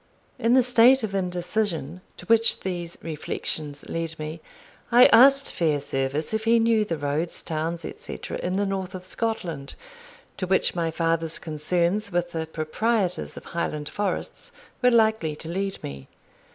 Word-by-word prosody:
In 235 +2 +3
the 260 - +6
state 245 +1 +5
of 210 -3 -3
indecision 180 -3 -2 0.2
to - - -10
which 230 +2 +3
these 175 -2 -4
reflections 150 -2 -4
led 165 -1 -4
me, 155 +1 -6 0.5
I 245 +2 +8
asked 275 +4 +6
Fairservice 145 -1 -1
if 220 0 -1
he 230 +1 +5
knew 225 -1 +3
the 170 -6 -3
roads, 150 +3 -2
towns, 165 +1 -3
etc., - - -6
in 180 +1 -2
the 205 +1 +1
north 190 -1 -3
of 185 0 -8
Scotland, 175 -10 -3 0.6
to 185 - -3
which 190 +1 +2
my 170 -2 -1
father's 165 0 +1
concerns 175 +6 0
with 175 0 -1
the 160 -1 -3
proprietors 180 +5 -1
of - - -9
Highland 150 -3 -3
forests 205 -1 -3 0.3
were 250 - +5
likely 220 -9 +2
to 160 - -9
lead 195 +3 -2
me. 70 -1 -7
175 Hz, 150 wpm, -25 LUFS, 160-215 Hz, 0.6 s, I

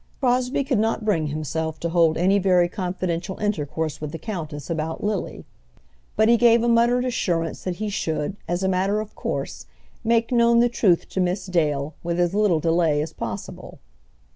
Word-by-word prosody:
Crosbie 255 +1 +1
could 260 -5 0
not 225 0 0
bring 165 -8 +1
himself 155 +1 -3
to 170 - -1
hold 165 -2 +3
any 190 +4 +3
very 180 -2 +3
confidential 180 -1 -3
intercourse 160 -7 -2
with 150 -1 -4
the 165 - -5
countess 155 - -6
about 160 -1 -3
Lily; 210 -2 -3 0.7
but 220 +1 +4
he 235 +1 +5
gave 235 0 +5
a - - +1
muttered 240 +2 +3
assurance 170 -9 -1
that 185 -1 -2
he 215 +4 -4
should, 160 -3 -2
as 175 +2 -1
a - - +2
matter 190 +3 +1
of 215 -1 -6
course, - - -4 0.4
make 230 +1 +2
known 235 -1 +4
the 240 +1 +4
truth 195 -7 +2
to - - -3
Miss 180 +2 0
Dale 155 -5 0
with 170 0 -2
as 175 0 +1
little 205 -6 +3
delay 165 -2 +2
as 155 +2 -3
possible. - - -7
180 Hz, 180 wpm, -23 LUFS, 160-220 Hz, 0.7 s, he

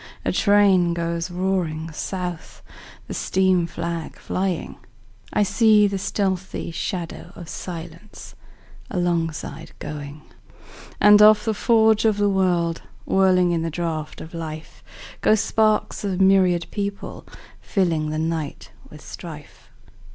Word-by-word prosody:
A - - +1
train 195 -4 +4
goes 170 +1 -2
roaring 175 -3 -2
south, 180 +2 -5 0.4
The - - -7
steam 185 -2 +1
flag 170 -1 -5
flying;I 190 +2 -4
see 210 +2 +4
the 200 -1 -1
stealthy 190 -3 -2
shadow 170 +1 -5
of 175 - -9
silenceAlongside 170 -1 -6
going. 150 0 -7 0.8
And 210 0 +7
off 210 0 +7
the 220 - +1
forge 220 0 +3
of 215 -2 +3
the 205 0 +2
world, 175 -3 +1 0.2
Whirling 185 -2 +3
in 170 -1 0
the 165 - -2
draught 160 -2 -4
of 160 - -10
life, 160 -1 -7 0.4
Go 215 - +5
sparks 215 0 +1
of 195 -2 -2
myriad 190 -3 +4
people, 200 -1 -5 0.4
fillingThe 155 -5 0
night 160 -2 -3 0.2
with - - -13
strife. - - -11
180 Hz, 115 wpm, -22 LUFS, 165-200 Hz, 0.8 s, And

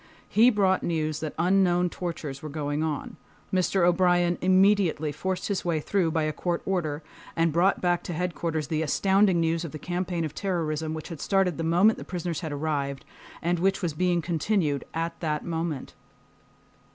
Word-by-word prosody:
He 230 +3 +5
brought 195 -5 +2
news 155 -2 -1
that 155 -2 -5
unknown 180 0 +3
tortures 155 -6 -5
were 155 - -6
going 145 0 -2
on. 155 -2 -3 0.4
Mr. 185 0 +2
O'Brien 175 -1 +3
immediately 185 -4 +3
forced 185 +5 -3
his 200 -2 -1
way 170 -3 0
through 180 +2 0
by 160 -1 0
a 155 0 -1
court 175 +1 -2
order, 160 -5 -1 0.3
and 165 -1 +2
brought 180 +4 +3
back 175 -1 +1
to 175 - -4
Headquarters 165 -2 -2
the 155 -1 0
astounding 190 +3 +3
news 165 0 +1
of 165 - -6
the - - -4
campaign 175 +1 -2
of 150 - -5
terrorism 160 -5 -2
which 155 - -7
had 165 -4 -7
started 190 -5 +1
the - - -1
moment 180 +7 +4
the - - -6
prisoners 175 -3 -4
had 160 -3 -5
arrived, 140 -2 -2 0.4
and 175 +1 +1
which 190 +2 +1
was 165 -3 0
being 175 +1 +1
continued 165 -3 0
at 165 +1 -3
that 150 -2 -2
moment. 165 -4 -3
170 Hz, 175 wpm, -26 LUFS, 155-185 Hz, 0.4 s, He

